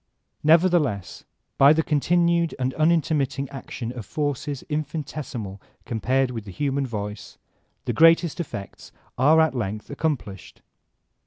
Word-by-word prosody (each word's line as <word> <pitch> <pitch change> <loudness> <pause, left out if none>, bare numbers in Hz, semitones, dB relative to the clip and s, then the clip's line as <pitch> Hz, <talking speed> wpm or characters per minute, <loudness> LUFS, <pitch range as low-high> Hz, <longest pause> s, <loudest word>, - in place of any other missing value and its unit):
Nevertheless, 155 - +2 0.3
by 140 +2 +8
the 160 +1 +1
continued 170 +2 +2
and 130 0 -1
unintermitting 155 -4 +1
ac 135 - -9
tion 120 -2 -5
of 120 -3 -7
forces 145 +3 -3
infinitesimal 150 -9 -5 0.2
compared 125 +3 0
with 115 -4 -6
the - - -9
human 140 +5 -1
voice, 105 -2 -6 0.5
the - - -1
greatest 165 0 +4
effects 100 - -7 0.2
are 150 +5 +5
at 160 -2 +3
length 105 -2 -4
accomplished. 135 - -4
140 Hz, 125 wpm, -24 LUFS, 120-160 Hz, 0.5 s, by